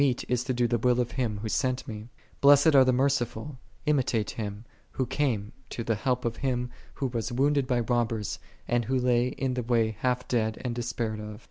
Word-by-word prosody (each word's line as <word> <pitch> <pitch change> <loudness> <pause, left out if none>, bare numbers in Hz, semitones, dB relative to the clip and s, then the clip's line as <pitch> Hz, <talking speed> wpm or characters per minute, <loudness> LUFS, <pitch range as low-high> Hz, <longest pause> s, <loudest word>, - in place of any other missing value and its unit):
it 130 -4 +2
is 125 -1 0
to 130 - -2
do 120 -1 +2
the 120 0 0
will 125 +1 +3
of 120 -1 0
Him 115 -5 -1
Who - - -2
sent 130 +1 0
Mr." 110 -2 -7
' - - -30
" - - -32
lilessed 145 +2 +7
are 135 -2 +8
the 130 - +3
merciful;" 130 0 0 0.3
imitate 130 -7 +1
Him, 105 0 -5 0.3
Who 130 - 0
came 115 -8 -1 0.2
to 115 - -4
the 115 - +1
help 125 +3 -1
of 115 -1 -1
him 125 -2 -1 0.2
who 140 - -2
was 120 -1 -2
wounded 140 +2 +2
by 125 -2 +1
robbers, 115 -3 -1 0.3
and 120 -1 +1
who 130 +3 +1
lay 125 -1 +2
in 130 0 -2
the 125 - -1
way 115 -2 +2
halt 125 0 0
dead 110 -3 0
and 120 - -1
de.spaired 115 -2 -3
of. 105 0 -7
125 Hz, 220 wpm, -28 LUFS, 115-130 Hz, 0.3 s, are